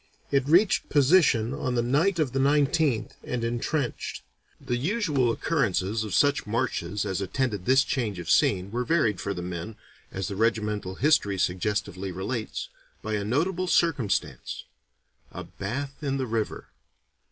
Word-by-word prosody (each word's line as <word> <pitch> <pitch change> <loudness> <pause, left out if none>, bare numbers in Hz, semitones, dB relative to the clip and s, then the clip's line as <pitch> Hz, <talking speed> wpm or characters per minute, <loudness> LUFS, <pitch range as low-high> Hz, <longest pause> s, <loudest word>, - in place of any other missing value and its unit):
It 140 -1 +2
reached 180 +7 +4
position 140 -6 +4
on 130 -3 -2
the 120 - +2
night 155 +10 +2
of 150 -6 +1
the 135 - -1
19th 145 -2 +2
and 125 -2 -3
entrenched. 120 +3 -2 0.4
The 120 - -2
usual 150 - +1
occurrences 110 - 0
of 105 - -3
such 145 -5 +3
marches 105 -4 -1
as 95 +1 -2
attended 105 -2 -2
this 130 +4 +5
change 115 -9 -2
of 85 -2 -7
scene 95 +2 +2
were 120 +2 -1
varied 120 - +1
for 100 - -3
the 90 - -5
men, 90 +5 -5 0.4
as 95 -2 -3
the 100 - -4
regimental 105 -3 0
history 135 -9 +2
suggestively 95 0 -1
relates, 105 +5 -4 0.4
by 110 - -3
a 105 -1 0
notable 170 - 0
circumstance 145 - 0 0.7
a - - -7
bath 135 +8 -5
in 135 -2 -1
the 130 - -1
river. 110 -2 -3
120 Hz, 150 wpm, -26 LUFS, 100-145 Hz, 0.7 s, this